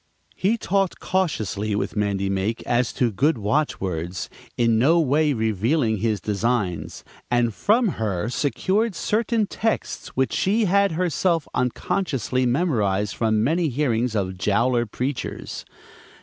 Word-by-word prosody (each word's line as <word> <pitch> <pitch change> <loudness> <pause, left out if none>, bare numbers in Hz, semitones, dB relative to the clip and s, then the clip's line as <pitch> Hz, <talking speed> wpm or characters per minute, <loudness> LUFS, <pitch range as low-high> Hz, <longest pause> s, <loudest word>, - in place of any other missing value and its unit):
He 210 +5 +1
talked 195 -3 0
cautiously 110 - -1
with 105 - -2
Mandy 100 -2 0
Make 95 +4 -1
as 120 0 +1
to 120 -3 +1
good 140 +7 +2
watch 130 +9 0
words, 90 -1 -4 0.3
in 115 -2 +3
no 160 +8 +4
way 150 0 +2
revealing 110 - +1
his 105 0 0
designs, 105 -3 -2 0.3
and 120 -2 +2
from 225 - +2
her 100 -3 -1
secured 190 - 0
certain 220 +5 +1
texts 220 +2 -2
which 130 0 +1
she 215 +4 +2
had 200 -1 +3
herself 170 -1 0
unconsciously 130 - -1
memorized 105 - +1
from 110 -2 +1
many 160 +5 +1
hearings 125 -4 0
of 95 -3 -2
Jowler 120 +5 +2
preachers. 130 +5 -4
125 Hz, 130 wpm, -23 LUFS, 105-165 Hz, 0.3 s, no